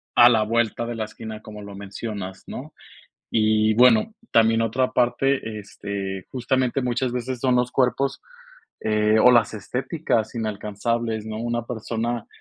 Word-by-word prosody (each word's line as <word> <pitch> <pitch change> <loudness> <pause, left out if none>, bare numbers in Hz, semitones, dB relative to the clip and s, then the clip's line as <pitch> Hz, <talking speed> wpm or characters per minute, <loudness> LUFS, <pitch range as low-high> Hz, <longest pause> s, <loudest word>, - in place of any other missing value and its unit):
a 120 0 +9
la 110 -3 +3
vuelta 115 +1 0
de 120 - -4
la 110 -1 -2
esquina, 110 0 -8
como 105 -1 -10
lo 100 -1 -9
mencionas, 100 -1 -6
¿no? - - -8 0.6
Y 110 0 +3
bueno, 120 - +5 0.2
también 115 0 +4
otra 120 +3 0
parte, 120 -2 +1
este, 100 -2 -5
justamente, 130 +1 0
muchas 125 +1 0
veces 125 +1 -3
son 125 0 +2
los 125 0 +1
cuerpos, 135 +2 +1 0.6
eh, 105 0 +2
o 125 +3 +7
las 115 -2 +3
estéticas 125 - -2
inalcanzables, 110 +1 -2
¿no? 110 0 -5
Una 120 0 -2
persona, 115 0 -3
115 Hz, 145 wpm, -23 LUFS, 110-125 Hz, 0.6 s, a